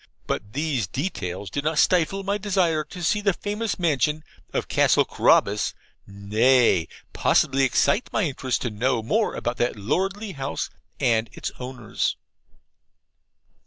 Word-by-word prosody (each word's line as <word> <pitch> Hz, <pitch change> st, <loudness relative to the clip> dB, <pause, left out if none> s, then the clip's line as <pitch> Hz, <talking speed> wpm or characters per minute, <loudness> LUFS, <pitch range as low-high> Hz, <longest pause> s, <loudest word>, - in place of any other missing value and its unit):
But 105 Hz, 0 st, -4 dB
these 140 Hz, -, -1 dB
details 95 Hz, -, -4 dB
did 145 Hz, -, -2 dB
not 155 Hz, +1 st, 0 dB
stifle 180 Hz, +4 st, +3 dB
my 200 Hz, +1 st, -1 dB
desire 185 Hz, -6 st, +1 dB
to 180 Hz, -2 st, -9 dB
see 210 Hz, +5 st, +2 dB
the 200 Hz, -2 st, +2 dB
famous 210 Hz, +4 st, -3 dB
mansion 155 Hz, -, +1 dB, 0.3 s
of -, -, -2 dB
Castle -, -, +3 dB
Carabas, 100 Hz, +1 st, +2 dB, 0.3 s
nay, 105 Hz, -1 st, +3 dB, 0.3 s
possibly 135 Hz, -2 st, +2 dB
excited 140 Hz, -, +2 dB
my 215 Hz, -, +1 dB
interest 135 Hz, -5 st, -1 dB
to 120 Hz, -, -2 dB
know 115 Hz, +2 st, 0 dB
more 215 Hz, -, 0 dB
about 120 Hz, +1 st, -3 dB
that 120 Hz, -, 0 dB
lordly 195 Hz, -, -2 dB
house 135 Hz, -4 st, -4 dB, 0.3 s
and 115 Hz, -4 st, +2 dB
its -, -, -5 dB
owners. 125 Hz, -3 st, -3 dB
140 Hz, 135 wpm, -24 LUFS, 115-185 Hz, 0.3 s, stifle